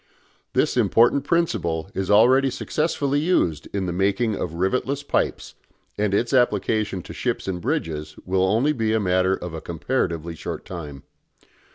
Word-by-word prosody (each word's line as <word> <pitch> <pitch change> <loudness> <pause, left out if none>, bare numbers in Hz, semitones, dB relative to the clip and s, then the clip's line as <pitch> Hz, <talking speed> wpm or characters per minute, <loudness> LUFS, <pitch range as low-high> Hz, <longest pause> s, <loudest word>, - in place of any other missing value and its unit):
This - - +1
important 120 +4 +4
principle 95 - 0
is 95 -1 -3
already 130 +6 +5
successfully 145 +1 -1
used 115 - +1
in 100 -2 -2
the 90 - -2
making 100 +5 +1
of 85 - -4
rivetless 130 +10 -1
pipes, - - -1 0.4
and 105 -1 0
its 115 +6 0
application 105 -5 +1
to - - -9
ships - - -2
and 90 -2 -3
bridges 75 -2 -3
will 95 +3 +2
be 150 - +3 0.2
only 110 - +2
a 110 - +2
matter 95 -1 +2
of 90 -3 -7
a 80 - -5
comparatively 85 -3 -2
short 80 - -6
time. 75 -6 -8
95 Hz, 155 wpm, -23 LUFS, 85-125 Hz, 0.4 s, already